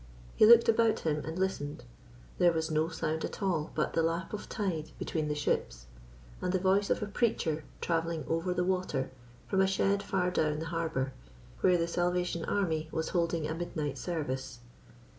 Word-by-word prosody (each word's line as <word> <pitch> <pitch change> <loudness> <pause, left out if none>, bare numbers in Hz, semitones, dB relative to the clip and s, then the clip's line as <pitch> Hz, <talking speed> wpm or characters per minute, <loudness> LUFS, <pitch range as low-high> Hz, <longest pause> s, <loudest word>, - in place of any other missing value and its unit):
He 215 - +7
looked 235 0 +8
about 230 -1 +3
him 150 -2 0
and 160 +2 -5
listened. 185 - -2 0.6
There 175 -1 +6
was 160 -1 -1
no 155 +1 +2
sound 160 -1 -2
at - - -4
all 165 -5 0
but 155 - 0
the 165 - +2
lap 165 +4 -1
of 210 - -5
tide 165 -7 -2
between 155 -2 -2
the 150 - -1
ships, - - -1 0.6
and - - 0
the 190 - +2
voice 195 +2 +2
of - - +1
a - - 0
preacher 200 -8 0 0.2
travelling 165 -1 -1
over 165 +3 0
the 180 0 +1
water 180 -8 -1 0.3
from 190 -1 +1
a 190 - +4
shed 195 +1 +2
far 180 -3 0
down 155 -4 +1
the 160 - -4
harbour, 160 -5 -1 0.5
where 180 -1 +4
the 170 0 0
Salvation 175 0 0
Army 160 -6 0
was 160 - -2
holding 170 -3 0
a 155 - -2
midnight 155 -4 -3
service. 130 -7 -3
165 Hz, 180 wpm, -31 LUFS, 155-185 Hz, 0.6 s, looked